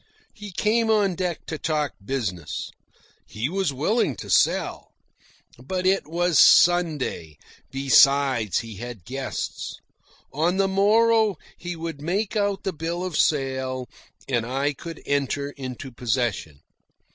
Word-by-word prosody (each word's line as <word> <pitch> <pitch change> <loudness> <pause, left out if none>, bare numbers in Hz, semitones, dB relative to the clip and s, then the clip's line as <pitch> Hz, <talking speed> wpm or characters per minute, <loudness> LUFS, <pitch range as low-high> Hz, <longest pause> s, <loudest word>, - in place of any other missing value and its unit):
He 210 -1 -9
came 220 +5 +1
on 205 -4 +3
deck 175 -1 -3
to 160 - -5
talk 150 -6 -1
business. 100 - -4 0.6
He 110 +6 -3
was 190 -3 0
willing 150 - 0
to - - -7
sell. - - +1 0.7
But 185 +6 -3
it 190 -2 +2
was 175 +1 +1
Sunday. 155 - +4 0.3
Besides, 135 - +3
he 115 -3 -9
had 120 -5 -8
guests. 135 +2 -5 0.6
On 170 +6 +1
the 195 0 +3
morrow 215 +2 +3 0.2
he 175 0 -6
would 165 -3 -6
make 195 +8 -1
out 200 -2 0
the 190 - -2
bill 165 +3 -3
of 185 -4 -4
sale 130 -4 0 0.4
and 120 -4 0
I 135 +5 -1
could 165 +4 -9
enter 140 0 -1
into 130 -1 -7
possession. 115 - -2
150 Hz, 130 wpm, -24 LUFS, 130-185 Hz, 0.7 s, Sunday